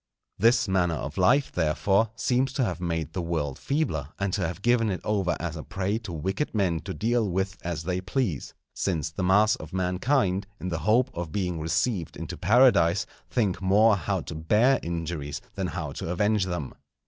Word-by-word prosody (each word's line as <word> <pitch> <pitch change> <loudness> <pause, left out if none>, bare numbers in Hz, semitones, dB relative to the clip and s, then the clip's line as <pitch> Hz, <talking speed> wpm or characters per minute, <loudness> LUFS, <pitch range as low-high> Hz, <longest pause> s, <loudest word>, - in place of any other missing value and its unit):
This 115 +2 +4
manner 90 -3 +1
of 75 +4 -5
life, 130 +10 +4
therefore, 95 +6 +2
seems 125 +3 +1
to 135 -2 +1
have 90 -3 -3
made 85 -3 -2
the 90 - -2
world 80 -4 -2
feebler, 110 - -1
and 100 -2 -1
to 95 -5 0
have 90 +4 -7
given 120 -2 +3
it 95 - -2
over 100 -4 0
as 85 -1 -4
a 80 - -5
prey 100 +6 -2
to 110 -6 -8
wicked 95 - -2
men 90 -6 +1
to 95 - -4
deal 115 -1 +1
with 95 +2 -1
as 85 -2 -4
they 90 +2 -2
please; 95 - -2 0.2
since 80 -4 -1
the 80 - -5
mass 105 +4 +4
of 80 +2 -10
mankind, 95 +2 +1
in 90 - -4
the 85 -2 -2
hope 125 +4 +4
of 85 -2 -5
being 90 -2 -2
received 85 +3 -1
into - - -5
Paradise, 100 -5 +4 0.2
think 100 -7 0
more 105 +3 +5
how 90 - -2
to - - -7
bear 105 +12 +3
injuries 80 -4 -4
than - - -2
how - - -4
to - - -5
avenge 105 +3 +1
them. 85 -7 -4
95 Hz, 190 wpm, -26 LUFS, 85-110 Hz, 0.2 s, more